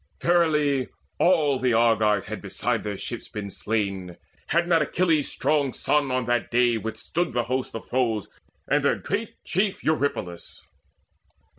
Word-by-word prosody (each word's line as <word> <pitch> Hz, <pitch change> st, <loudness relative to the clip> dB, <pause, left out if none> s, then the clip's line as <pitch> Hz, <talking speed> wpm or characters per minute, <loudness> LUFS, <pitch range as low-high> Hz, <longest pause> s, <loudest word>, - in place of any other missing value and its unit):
Verily 150 Hz, -6 st, +2 dB, 0.3 s
all 155 Hz, -7 st, +3 dB
The 125 Hz, -2 st, +2 dB
Argives 110 Hz, -3 st, +3 dB
had -, -, -6 dB
beside -, -, -2 dB
their 105 Hz, -2 st, -4 dB
ships 120 Hz, +3 st, -6 dB
been 100 Hz, -2 st, -6 dB
slain, 100 Hz, -4 st, -2 dB, 0.3 s
Had 170 Hz, +1 st, +1 dB
not 165 Hz, -2 st, +4 dB
Achilles' 160 Hz, -1 st, +1 dB
strong 145 Hz, -4 st, +1 dB
son 145 Hz, -2 st, +1 dB
on 130 Hz, -1 st, 0 dB
that 120 Hz, -1 st, 0 dB
day 120 Hz, 0 st, +3 dB
Withstood 120 Hz, -, -3 dB
the 120 Hz, 0 st, +1 dB
host 130 Hz, +1 st, -3 dB
of 115 Hz, -, -6 dB
foes 115 Hz, -5 st, 0 dB, 0.4 s
and -, -, +2 dB
their -, -, +3 dB
great -, -, -3 dB
chief 195 Hz, +2 st, -1 dB
Eurypylus. 125 Hz, -, -2 dB
125 Hz, 145 wpm, -25 LUFS, 110-150 Hz, 0.4 s, not